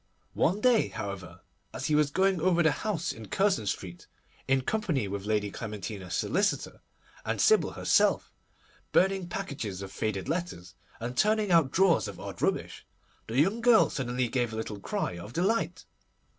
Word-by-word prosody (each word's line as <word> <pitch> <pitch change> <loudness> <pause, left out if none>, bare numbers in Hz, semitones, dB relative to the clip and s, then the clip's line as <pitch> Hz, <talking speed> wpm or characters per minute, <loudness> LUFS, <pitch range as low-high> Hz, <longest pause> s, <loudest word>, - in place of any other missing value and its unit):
One 185 +9 +1
day, 245 -2 +4
however, 100 -3 -7 0.3
as - - -4
he 155 - 0
was 150 -1 +3
going 190 +2 +1
over 175 -1 +3
the 160 - +4
house 175 -6 -2
in 110 -1 -10
Curzon 190 - +1
Street, 90 -2 -5 0.4
in 135 0 +3
company 160 - -1
with 100 0 -5
Lady 105 -1 0
Clementina's 105 -4 -6
solicitor 200 +2 0 0.4
and - - -2
Sybil 435 0 +4
herself, - - +2 0.6
burning 190 -1 +2
packages 135 - -4
of 95 - -8
faded 100 -3 -3
letters, 155 - -4 0.3
and 120 +2 -5
turning 215 +3 +2
out 165 -5 +5
drawers 185 +2 +3
of - - -8
odd - - -7
rubbish, - - -1 0.4
the 115 +4 0
young 195 +10 +2
girl 235 -1 +5
suddenly 125 -1 -1
gave 120 -1 -1
a - - -6
little 110 -2 -5
cry 90 -2 -3
of 105 +7 -9
delight. 195 +7 0
140 Hz, 160 wpm, -29 LUFS, -, 0.6 s, out